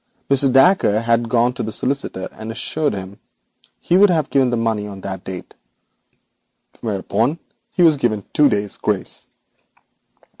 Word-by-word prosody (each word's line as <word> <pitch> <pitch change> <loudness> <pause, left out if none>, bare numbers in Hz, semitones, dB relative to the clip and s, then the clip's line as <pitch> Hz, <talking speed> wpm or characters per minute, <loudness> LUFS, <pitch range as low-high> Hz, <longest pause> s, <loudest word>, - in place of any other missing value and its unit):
Mr. 135 -1 +4
Dacre 135 - +4
had 115 0 +1
gone 120 +1 +2
to 125 - -5
the 110 - -3
solicitor 125 -5 -2
and 110 +1 -8
assured 150 +3 -1
him 95 +1 -8 0.6
he 175 - +2
would 205 +1 +6
pay 140 -6 +2
the 120 - 0
money 110 -2 -1
on 100 -2 -9
that 95 -1 -6
date, 95 -1 -8 1.3
whereupon 110 - -1 0.3
he 180 - +2
was 160 -3 +5
given 110 -6 -1
two 150 -1 +5
days' 100 -4 -2
grace.' - - -3
115 Hz, 145 wpm, -19 LUFS, 105-140 Hz, 1.3 s, would